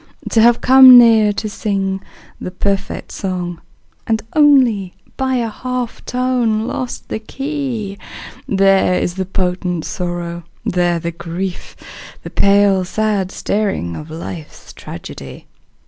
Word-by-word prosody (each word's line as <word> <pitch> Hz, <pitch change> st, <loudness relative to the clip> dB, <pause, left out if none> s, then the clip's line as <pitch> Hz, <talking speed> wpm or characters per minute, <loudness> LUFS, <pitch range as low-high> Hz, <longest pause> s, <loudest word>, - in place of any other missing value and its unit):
To 225 Hz, -, +4 dB
have 235 Hz, +1 st, +4 dB
come 260 Hz, -1 st, +9 dB
near 225 Hz, -3 st, +6 dB
to 215 Hz, -, -4 dB
sing 195 Hz, -2 st, -2 dB, 0.4 s
the -, -, -5 dB
perfect 195 Hz, +2 st, -3 dB
song 180 Hz, -3 st, -4 dB, 0.5 s
And 220 Hz, -1 st, 0 dB
only 255 Hz, -11 st, +3 dB, 0.2 s
by 260 Hz, -1 st, -1 dB
a 235 Hz, -2 st, 0 dB
half 250 Hz, +2 st, -5 dB
tone 245 Hz, -4 st, 0 dB
lost 255 Hz, -1 st, -5 dB
the -, -, -3 dB
key, 250 Hz, -5 st, -4 dB, 0.5 s
There 195 Hz, -2 st, +3 dB
is 175 Hz, -, -1 dB
the 190 Hz, +1 st, -3 dB
potent 180 Hz, -2 st, -2 dB
sorrow, 175 Hz, -1 st, -4 dB, 0.2 s
there 175 Hz, -1 st, +1 dB
the 170 Hz, +1 st, -4 dB
grief, 175 Hz, +2 st, -6 dB, 0.5 s
The -, -, -8 dB
pale, 200 Hz, -1 st, +3 dB
sad 200 Hz, 0 st, -1 dB
staring 195 Hz, -, -2 dB
of 150 Hz, -, -8 dB
life's 160 Hz, 0 st, -9 dB
tragedy. 65 Hz, -1 st, -10 dB
200 Hz, 125 wpm, -17 LUFS, 180-230 Hz, 0.5 s, come